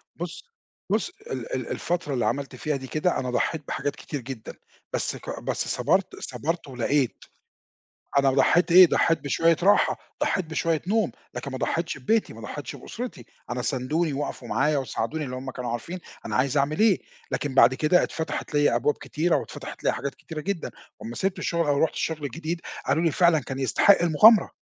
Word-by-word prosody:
بُص - - -6 0.5
بُص، - - +1 0.2
ال - - -5
ال - - -3
الفترة 170 -4 -2
اللي 125 - 0
عملت 140 -1 -2
فيها 150 -1 -2
دي 135 -1 -6
كده، 155 +6 0
أنا 130 - -3
ضحّيت 150 +4 -1
بحاجات 145 - -2
كتير 145 - -6
جدًا، 120 -2 -7 0.4
بس - - -1
ك - - -6
بس - - -2
صَبرت - - +1
صَبرت 165 +2 -3
ولقيت. 130 +1 -1 0.9
أنا 135 -1 +4
ضحّيت 170 +6 +3
إيه، 180 +1 +10
ضحّيت 165 0 +2
بشوية 165 +3 +2
راحة، 205 +2 +4 0.2
ضحّيت 190 - +1
بشوية 160 0 0
نوم، 215 -2 +2 0.2
لكن 140 - -5
ما 130 - -4
ضحّيتش 165 +4 -1
ببيتي، 215 - +1
ما - - -11
ضحّيتش - - -6
بأُسرتي. 245 +1 -7 0.2
أنا 125 +1 -2
ساندوني، 145 +5 0
وقفوا 135 -3 -4
معايا 150 +5 +2
وساعدوني 150 +3 -2
لإن 125 - -6
هم 130 +1 -5
كانوا 125 -2 -4
عارفين 165 +10 -4 0.3
أنا 110 - -3
عايز 135 +5 +2
أعمل 145 +2 +1
إيه، 215 -4 +5 0.3
لكن 145 -2 -2
بعد 130 -1 +6
كده 155 +7 +3
اتفتحت 160 -1 -4
ليّا 145 -4 +3
أبواب 135 +5 +2
كتيرة 165 +2 0
واتفتحت - - -6
ليّا - - +3
حاجات 140 +2 -4
كتيرة 160 -2 -7
جدًا 180 +1 -3 0.3
وأمّا 115 +2 -7
سِبت 190 +5 -1
الشُغل 170 -2 0
أو 145 -1 +2
رُحت 160 - +1
الشُغل 155 -3 -2
جديد، 165 +4 -4 0.2
قالوا 165 - +2
لي:" 165 - +3
فعلًا، 170 -2 +4
كان 135 -1 -6
يستحق 170 +9 +4
المُغامرة." 175 +5 +6
150 Hz, 185 wpm, -25 LUFS, 135-170 Hz, 0.9 s, إيه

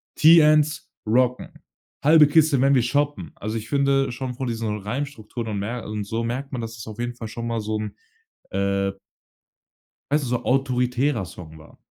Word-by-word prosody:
TNs 155 -2 +5 0.2
Rocken. 125 +3 +1 0.5
Halbe 155 +1 +7
Kiste, 150 -3 +4
wenn 140 +1 +4
wir 125 - +4
shoppen.“ 140 - -1
Also, 110 +2 -4
ich 110 0 -6
finde 140 -2 +2
schon 125 0 -4
von 130 0 -4
diesen 115 -2 -2
Reimstrukturen 115 0 -5
und 100 -2 -2
mer 115 +3 -4
und 105 -1 -4
so 115 +3 -2
merkt 130 +4 -4
man, 120 - -2
dass 115 0 -6
es 110 - -9
auf 110 +1 -9
jeden 120 0 -3
Fall 115 -2 -7
schon 115 +1 -6
mal 115 -1 -1
so 110 +1 -2
'n, 105 - -5 0.6
äh 100 0 0 1.2
weißt 150 -1 +2
du, - - -4
so 125 0 -1
autoritärer 125 -2 +1
Song 80 -3 -11
war. 80 - -17
120 Hz, 180 wpm, -23 LUFS, 110-140 Hz, 1.2 s, Halbe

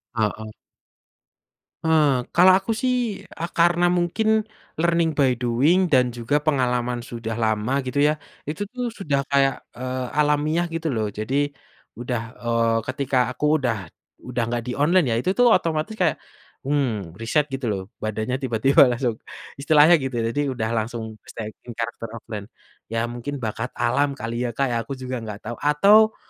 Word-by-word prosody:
Heeh. 110 0 -2 1.3
Eee, 150 -6 +3
kalau 185 +2 +7
aku 210 +4 -3
sih 255 -1 +2 0.4
a - - -6
karena 175 +1 +3
mungkin, 180 +5 0 0.5
learning 170 -1 +2
by 130 -4 +3
doing 130 +10 +2
dan 125 -3 +4
juga 120 +5 0
pengalaman 125 -4 0
sudah 115 -2 -5
lama 110 +2 0
gitu 135 +3 -2
ya. 150 - +3 0.4
Itu 155 +6 -5
tuh 250 -1 -2
sudah 145 -7 0
kayak, 135 -2 +3 0.2
eee, 130 +1 -3
alamiah 150 +3 +2
gitu 165 0 -3
loh, 105 -2 -1
jadi, 140 +6 0 0.5
udah 120 -2 -2 0.2
eee, 115 -1 +1
ketika 135 0 -1 0.2
aku 150 +1 +2
udah 120 -4 0 0.5
udah 125 0 -3
nggak 120 0 -2
di 125 - -2
online 170 +4 +4
ya, - - +2
itu 155 - -1
tuh 245 -1 +5
otomatis 160 0 +1
kayak, 165 -3 +3 0.5
mmm, 125 - -1
riset 140 +6 +1
gitu 135 -1 -4
loh 100 -3 -1 0.2
badannya 110 +4 -2
tiba 120 -3 -1
tiba 135 0 +7
langsung 120 -2 -1 0.4
istilahnya 155 +4 +6
gitu. 130 -2 -4
Jadi 115 +6 0
udah 110 -2 -2
langsung 115 +1 -3 0.2
stay 110 -1 -6 0.2
in 120 - -7
karakter 115 0 -4
offline. 105 -2 -7 0.4
Ya 115 0 -1
mungkin 130 +2 -6
bakat 115 +3 -4
alam 140 +4 +1
kali 115 +2 -2
ya - - -2
Kak, 135 -1 0 0.2
aku 135 - -4
juga 130 -1 -5
nggak 105 -2 -7
tahu, - - -5
atau, 200 +9 +5
130 Hz, 160 wpm, -23 LUFS, 115-150 Hz, 1.3 s, kalau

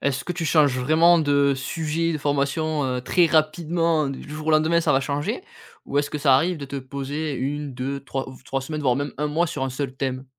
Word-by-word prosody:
est-ce 140 -1 -1
que 175 - -3
tu 170 -1 -4
changes 150 -5 +3
vraiment 160 +6 +5
de 140 -2 +3
sujet 160 +4 -2
de 155 - -2
formation, 145 +1 0
heu, 125 -1 -1
très 170 +8 +3
rapidement 160 0 +1
du 135 0 -7
jour 155 0 -7
au - - +4
lendemain 160 +2 +3
ça - - +2
va 135 - +3
changer? 140 +2 -2 0.4
Ou 140 - 0
est-ce 145 0 0
que 150 - -3
ça 140 -2 +4
arrive 175 +6 +1
de 145 - -6
te 140 +1 -6
poser 140 +3 -4
1-2-3 135 0 -4
ou 130 - -10
3 135 - -2
semaines 155 +3 -5
voir 125 -3 +3
même 145 +1 -3
1 150 - 0
mois 160 +4 0
sur 145 -3 -3
un 135 - -2
seul 135 0 -3
thème? 130 -1 -3
145 Hz, 225 wpm, -23 LUFS, 135-155 Hz, 0.4 s, vraiment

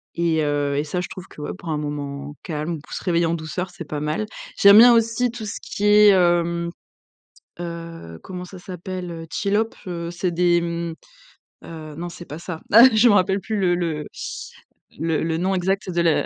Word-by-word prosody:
et 170 -2 +1
heu, 145 -1 0
et 145 - 0
ça 180 +4 -2
je 180 - -6
trouve 185 0 -9
que - - -12
ouais, 150 - -4
pour 170 - -12
un 155 - 0
moment 145 -1 -5
calme 155 +1 -3
pour - - -13
se - - -5
réveiller 170 -2 +2
en 165 - 0
douceur, 170 +3 -4
c'est 175 - -8
pas 150 0 -4
mal. 155 +8 -2 0.3
J'aime 200 +1 +8
bien 240 +2 +9
aussi 230 +1 +2
tout 230 -3 -7
ce 205 - -5
qui 205 - -6
est, 210 0 +7
hem, 170 -2 +2 0.9
heu, 165 - -7
comment 180 -1 -7
ça 185 +1 -11
s'appelle, 180 0 -6
heu, 165 -1 -7
chillhop 210 +5 0 0.2
heu, 170 -2 -4
c'est 175 +1 -2
des 175 0 +3
mmh, 170 -1 -3 0.7
heu, 155 -2 -9
non 175 +2 -5
c'est 175 0 -10
pas 150 - -8
ça, 170 -1 -7
ah, 230 +3 +9
je 220 +2 +6
me 205 - +5
rappelle 190 +1 +2
plus, 210 +5 -3
le 180 -2 +2
le 160 -4 -2 0.9
le 160 0 0
le 160 0 -1
nom 190 +2 0
exact 190 +1 -1
de 175 - -1
la 165 -2 +2
170 Hz, 205 wpm, -22 LUFS, 160-190 Hz, 0.9 s, bien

